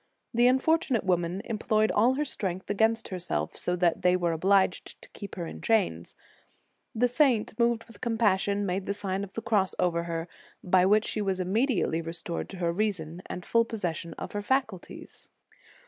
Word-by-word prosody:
The 240 Hz, +1 st, +4 dB
unfortunate 265 Hz, -2 st, +2 dB
woman 180 Hz, 0 st, 0 dB
employed 215 Hz, -1 st, +1 dB
all 240 Hz, +5 st, +3 dB
her 300 Hz, +2 st, -1 dB
strength 190 Hz, -7 st, -3 dB
against 225 Hz, +2 st, +1 dB
herself, 180 Hz, -2 st, -3 dB
so 180 Hz, -, 0 dB
that 175 Hz, -2 st, +1 dB
they 180 Hz, 0 st, +4 dB
were 175 Hz, -2 st, 0 dB
obliged 190 Hz, +3 st, +1 dB
to -, -, -14 dB
keep 200 Hz, -, -9 dB
her 175 Hz, -, -4 dB
in -, -, -8 dB
chains. 195 Hz, -, 0 dB, 0.8 s
The 245 Hz, +3 st, +3 dB
saint, 245 Hz, -3 st, +2 dB
moved 235 Hz, -1 st, +2 dB
with 230 Hz, -3 st, -17 dB
compassion, 205 Hz, -3 st, +1 dB
made 190 Hz, +1 st, -2 dB
the 200 Hz, -, -1 dB
Sign 195 Hz, -1 st, -2 dB
of 195 Hz, -, -9 dB
the 225 Hz, -, -5 dB
Cross 210 Hz, -5 st, +1 dB
over 170 Hz, -1 st, 0 dB
her, 165 Hz, 0 st, -3 dB, 0.4 s
by 185 Hz, 0 st, +4 dB
which 215 Hz, +2 st, +4 dB
she 215 Hz, -, -2 dB
was 190 Hz, -2 st, -1 dB
immediately 190 Hz, -, +1 dB
restored 165 Hz, +1 st, -5 dB
to 195 Hz, -, -8 dB
her 170 Hz, -1 st, 0 dB
reason 180 Hz, -4 st, -2 dB
and 180 Hz, -, -6 dB
full 230 Hz, 0 st, +3 dB
possession 175 Hz, -7 st, -4 dB
of -, -, -7 dB
her 205 Hz, -, -3 dB
faculties. 220 Hz, -5 st, -3 dB
200 Hz, 180 wpm, -28 LUFS, 180-225 Hz, 0.8 s, The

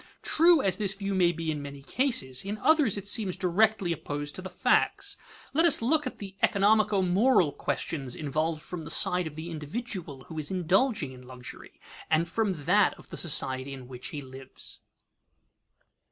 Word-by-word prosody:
True 330 Hz, -2 st, +4 dB
as 190 Hz, -2 st, 0 dB
this 200 Hz, -2 st, -2 dB
view 200 Hz, 0 st, -3 dB
may 180 Hz, -2 st, +3 dB
be 165 Hz, -1 st, -3 dB
in 150 Hz, -1 st, -4 dB
many 140 Hz, -1 st, -9 dB
cases, 140 Hz, -, +2 dB
in 200 Hz, +2 st, -4 dB
others 280 Hz, -, +3 dB
it 200 Hz, 0 st, -6 dB
seems 200 Hz, -4 st, +1 dB
directly 195 Hz, 0 st, +1 dB
opposed 145 Hz, -1 st, -5 dB
to -, -, -7 dB
the 185 Hz, -, -7 dB
facts. -, -, +1 dB, 0.4 s
Let 320 Hz, +4 st, +3 dB
us 335 Hz, -4 st, +5 dB
look 295 Hz, +5 st, +1 dB
at -, -, -7 dB
the 195 Hz, -2 st, -8 dB
economico 205 Hz, 0 st, +3 dB
moral 190 Hz, -, +3 dB
questions 135 Hz, -3 st, -3 dB
involved 155 Hz, +2 st, -2 dB
from 170 Hz, -2 st, -7 dB
the 150 Hz, -, -8 dB
side 180 Hz, -1 st, +4 dB
of 150 Hz, -, -9 dB
the 160 Hz, +2 st, -7 dB
individual 165 Hz, -, -6 dB
who 160 Hz, -2 st, -8 dB
is 150 Hz, -, -4 dB
indulging 185 Hz, -, +1 dB
in 130 Hz, -1 st, -12 dB
luxury, 125 Hz, -1 st, -11 dB, 0.3 s
and 160 Hz, +2 st, +2 dB
from 190 Hz, -10 st, -2 dB
that 200 Hz, +4 st, +3 dB
of -, -, -17 dB
the -, -, -6 dB
society 135 Hz, -4 st, +2 dB
in 130 Hz, -2 st, -10 dB
which 125 Hz, -1 st, -7 dB
he 145 Hz, -2 st, -6 dB
lives. 130 Hz, 0 st, -10 dB
180 Hz, 180 wpm, -28 LUFS, 145-210 Hz, 0.4 s, us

